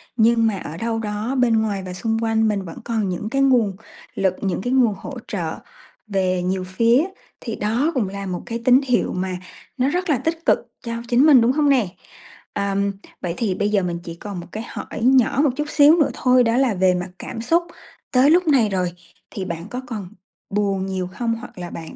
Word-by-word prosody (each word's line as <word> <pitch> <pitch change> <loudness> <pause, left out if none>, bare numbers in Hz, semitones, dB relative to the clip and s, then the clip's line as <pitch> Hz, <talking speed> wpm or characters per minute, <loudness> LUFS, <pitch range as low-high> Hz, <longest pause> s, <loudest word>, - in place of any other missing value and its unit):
nhưng 230 0 +4
mà 205 - -1
ở 160 -3 -7
đâu 225 +3 -2
đó 215 +4 -3
bên 235 -3 +3
ngoài 200 -3 -2
và 180 - -6
xung 225 +4 -1
quanh 225 0 +2
mình 205 -2 0
vẫn 165 - -9
còn 220 -4 -1
những 185 +4 -3
cái 275 +2 0
nguồn 240 -8 +3 0.4
lực, 190 -2 +1
những 190 -2 -1
cái 245 +4 -1
nguồn 240 -5 +4
hỗ 275 +4 -8
trợ 170 -6 -3 0.5
về 185 -3 0
nhiều 185 0 -1
phía, 230 - +3 0.4
thì 225 -3 -5
đó 240 +10 0
cũng 225 -8 0
là 200 0 -6
một 180 -2 -4
cái 230 0 -4
tín 255 +2 +6
hiệu 250 -3 0
mà 185 0 -2 0.4
nó 260 +1 +2
rất 360 +4 -1
là 285 - +3
tích 325 +5 -3
cực - - +4 0.2
cho 230 -1 -4
chính 245 +4 +4
mình, 280 -6 +7
đúng 235 - +4
hông 290 +1 +2
nè? 250 -8 +3 0.7
Ờm, 200 0 0 0.3
vậy 175 -2 -2
thì 200 -6 0
bây 205 - 0
giờ 205 -2 +2
mình 175 -1 -2
chỉ 170 - -7
còn 195 +1 -7
một 175 - -9
cái 220 - -5
hỏi - - -7
nhỏ 255 +1 +4
một 290 - +4
chút 300 - -2
xíu 295 +2 +6
nữa 295 - +3
thôi, 250 -1 +4
đó 230 +1 +2
là 260 -5 +3
về 185 -1 +3
mặt 180 +1 -3
cảm 225 - -6
xúc, 335 +8 +2 0.5
tới 265 +2 +5
lúc 355 0 +4
này 255 -8 +4
rồi 185 -3 -1 0.4
thì 195 - -4
bạn 170 +1 -5
có 250 +1 -4
còn 210 -7 -6 0.4
buồn 195 -2 0
nhiều 185 -2 -3
hông? 230 -1 -1
Hoặc 230 -2 -11
là 175 -1 -6
bạn 165 -1 -8
220 Hz, 225 wpm, -21 LUFS, 190-250 Hz, 0.7 s, mình